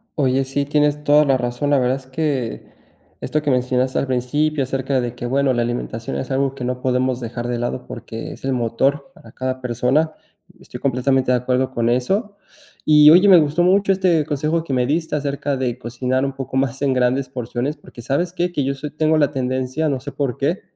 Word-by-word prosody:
Oye, 135 -2 +2
sí, 135 +2 -2
tienes 150 0 +1
toda 150 +1 +5
la 135 -2 +3
razón, 120 +3 -2
la 145 -1 +4
verdad 125 +1 +1
es 130 -1 -14
que 135 -5 -2 0.5
esto 155 - -1
que 145 -2 0
mencionaste 125 0 +1
al 140 - -2
principio 140 +4 0
acerca 130 +1 -1
de 120 -1 -3
que 120 - -6
bueno, 135 +2 +1
la 120 - 0
alimentación 115 -1 -3
es 130 - -5
algo 135 0 0
que 130 -2 -5
no 125 0 -3
podemos 130 0 0
dejar 120 +1 -5
de 120 -1 -2
lado, 120 +1 -3
porque 115 -1 -7
es - - -15
el 135 - -1
motor 130 +4 0
para 115 - -16
cada 130 +1 -4
persona. 125 +6 +1 0.5
Estoy - - -10
completamente 130 0 +1
de 125 - +4
acuerdo 130 +1 0
con 115 0 0
eso. 195 - 0 0.5
Y 150 -1 +7
oye, 185 +4 +7
me 180 -3 +9
gustó 155 +3 +1
mucho 195 +2 +3
este 180 -5 +2
consejo 155 +3 -1
que 140 -5 -4
me 125 -1 +2
diste 160 +2 -1
acerca 140 -1 -2
de 125 -2 -2
cocinar 125 +2 -2
un 135 - -3
poco 135 0 -4
más 135 0 -1
en 140 -2 +2
grandes 130 +1 +1
porciones. 125 +3 -3
Porque, 120 - -13
¿sabes 170 +9 -1
qué?, 175 0 -1
que 150 -5 -1
yo 140 +1 0
soy 145 +2 -7
tengo 155 +1 +1
la 145 -2 +2
tendencia, 130 +3 -1
no 135 -2 -1
sé 145 +2 -7
por 135 -4 -2
qué, 160 +7 -1
135 Hz, 215 wpm, -20 LUFS, 125-150 Hz, 0.5 s, me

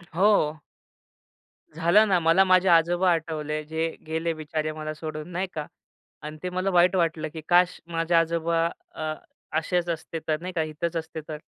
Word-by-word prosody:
हो. 175 -6 +3 1.2
झालं 170 +7 +4
ना, 185 -3 +3
मला 165 +3 +5
माझे 185 0 +4
आजोबा 175 +2 +4
आठवले 155 -2 -2
जे 160 +1 -1 0.2
गेले 160 +1 -1
बिचारे 155 0 -3
मला 155 0 -5
सोडून 155 +1 -6
नाही 185 +2 -2
का 150 -2 -4 0.6
आणि 155 +1 -7
ते 180 - -2
मला 185 +2 -1
वाईट 180 +2 +4
वाटलं 165 -3 0
की 160 - -6
काश! 180 +1 +4
माझे 165 0 -1
आजोबा 165 0 +2 0.3
अ, 155 0 -3 0.4
असेच 175 +2 0
असते, 165 0 -4
तर 155 -1 0
नाही 185 0 -5
का 165 - 0
इथंच 160 +2 -4
असते 160 -1 -5
तर? 155 -1 -5
165 Hz, 165 wpm, -26 LUFS, 155-175 Hz, 1.2 s, मला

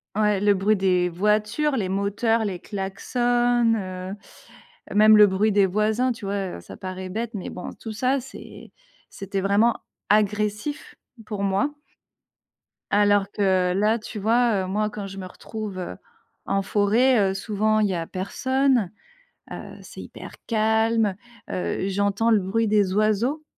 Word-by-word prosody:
Ouais, 210 -2 +2
le 205 -1 +4
bruit 205 +3 +2
des 180 -2 +2
voitures, 210 - +1
les 195 -5 -1
moteurs, 205 +4 0
les 190 -4 -3
klaxons, 240 +5 0
heu, 185 -1 -6 0.8
même 215 +1 +7
le 210 0 +8
bruit 205 +3 +1
des 200 -1 +4
voisins, 215 +6 +1
tu 225 -3 -10
vois? 195 -2 -3
Heu, - - -11
ça - - -12
paraît 185 0 -6
bête, 225 +4 -4
mais 190 - -5
bon, 180 - -7
tout 225 - -8
ça, 255 +5 +1
c'est 265 - -12 0.4
c'était 195 0 -4
vraiment 205 +4 +3 0.3
agressif 210 +7 0 0.3
pour 205 -2 -4
moi. 200 +9 +1 1.2
Alors 205 -1 +3
que 185 -3 +1
là, 210 +4 +2
tu 215 0 -8
vois, 225 -1 +2
heu, - - -6
moi, 210 +3 -1
quand 205 -1 -6
je 195 0 -9
me 190 - -6
retrouve, 205 +1 -7
heu, 175 - -6 0.5
en 195 0 0
forêt, 210 +2 +3
heu, - - -3
souvent 215 +2 0
il 210 - +3
y 185 - -1
a 165 -1 -3
personne, 255 +4 0 0.6
heu, - - -8
c'est - - -11
hyper - - -10
calme, 220 -2 +2 0.3
heu, 185 +1 -2
j'entends 200 +3 +1
le 220 - +5
bruit 210 +4 0
des 205 -3 +2
oiseaux. 215 +9 +1
210 Hz, 155 wpm, -24 LUFS, 195-225 Hz, 1.2 s, le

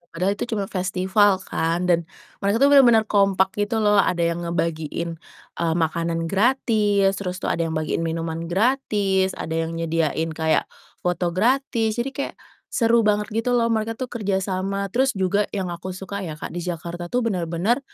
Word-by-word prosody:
padahal 185 +4 +1
itu - - -1
cuman 200 -2 -1
festival 190 +2 +2 0.2
kan, 165 +2 0
dan 170 -1 +5 0.4
mereka 200 +1 +1
tuh - - +7
bener-bener 240 -5 +7
kompak 195 -2 +3
gitu 205 +2 0
loh, 205 -1 +4
ada 175 -3 0
yang 170 0 -1
ngebagiin, 165 0 -2 0.5
eee, 165 -1 +1
makanan 165 +1 -1
gratis, 205 -3 +2
terus 180 -2 -3
tuh - - +1
ada 170 - -1
yang 160 - -3
bagiin 155 0 -1
minuman 165 0 -3
gratis, 195 -3 +1
ada 160 - -4
yang 165 - -5
nyediain 165 -1 0
kayak 160 0 +1 0.4
foto 175 0 +1
gratis, 230 0 +1
jadi 260 - -3
kayak, 280 - -4 0.3
seru 235 -1 +3
banget 210 0 +1
gitu 230 +3 0
loh, 230 -1 +2
mereka 225 0 0
tuh 255 +1 -5
kerjasama, 195 -2 -2
terus 265 +4 +2
juga 195 +2 +1
yang 190 -3 -2
aku 175 +2 -6
suka 195 +1 -6
ya, 160 - -5
Kak, 150 - -7
di 175 - -4
Jakarta 175 0 -5
tuh 245 +8 0
bener-bener, 185 +2 0
190 Hz, 170 wpm, -23 LUFS, 170-215 Hz, 0.5 s, tuh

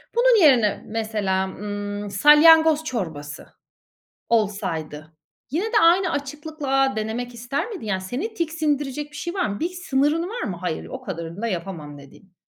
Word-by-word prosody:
Bunun 475 -5 +5
yerine, 240 -8 +4
mesela, 210 -4 -1
ımm, 205 +1 -5
salyangoz 310 +7 +6
çorbası 160 - -5 0.8
olsaydı, 165 -8 -2 0.4
yine 350 +8 0
de 445 -1 +2
aynı 350 +2 +4
açıklıkla 285 -2 -1
denemek 225 +3 -3
ister 265 - -3
miydin? 375 - -7
Yani, 190 -3 -1
seni 275 - -4
tiksindirecek 295 -5 -2
bir 295 - -14
şey 345 - -4
var 380 -2 0
mı? 200 0 -5
Bir 335 - -1
sınırın 325 -3 0
var 480 - -5
mı? 185 -5 -4
"Hayır, 180 -3 -3
o 260 - -7
kadarını 170 -3 -6
da 230 - -1
yapamam." 170 -6 -5
dediğin. 145 +7 -17
245 Hz, 150 wpm, -23 LUFS, 195-315 Hz, 0.8 s, salyangoz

